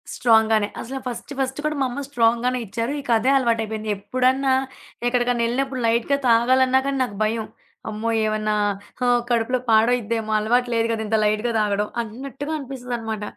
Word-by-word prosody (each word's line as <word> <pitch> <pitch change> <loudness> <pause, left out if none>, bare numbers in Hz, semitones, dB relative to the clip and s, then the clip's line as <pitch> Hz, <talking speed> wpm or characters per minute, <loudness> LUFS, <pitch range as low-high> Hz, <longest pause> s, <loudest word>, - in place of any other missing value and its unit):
Strong 220 -2 +4
గానే. 215 -2 +2
అసలు 265 +3 -6
first 245 +3 -6
first 265 +1 -2
కూడా 305 0 0
మా - - +3
అమ్మ 265 +4 -5
స్ట్రాంగ్‌ 235 -3 +2
గానే 250 0 +1
ఇచ్చారు. 230 +6 -3
ఇక 270 - -14
అదే 255 - +1
అలవాటయిపోయింది. 220 -3 -1
ఎప్పుడన్నా 255 +6 +1 0.5
ఎక్కడికన్నా 245 -1 +1
ఎళ్ళినప్పుడు 260 +2 -2
లైట్‌గా 235 +5 +2
తాగాలన్నా 255 +3 +4
కానీ 275 0 -1
నాకు 205 -5 -5
భయం. 220 +1 -1 0.4
అమ్మో! 215 +1 -3 0.2
ఏవన్నా 215 0 0 0.5
ఆహ్, 245 0 +4
కడుపులో 240 +2 +1
పాడయిద్దేమో 225 -1 +2
అలవాటు 245 +3 +1
లేదు 230 0 +2
గదా! 220 -1 -2
ఇంత 220 +1 +2
లైట్‌గా 215 +3 +1
తాగడం 210 0 0
అన్నట్టుగా 270 +6 -7
అనిపిస్తదనమాట. 245 -6 -5
235 Hz, 155 wpm, -22 LUFS, 220-255 Hz, 0.5 s, స్ట్రాంగ్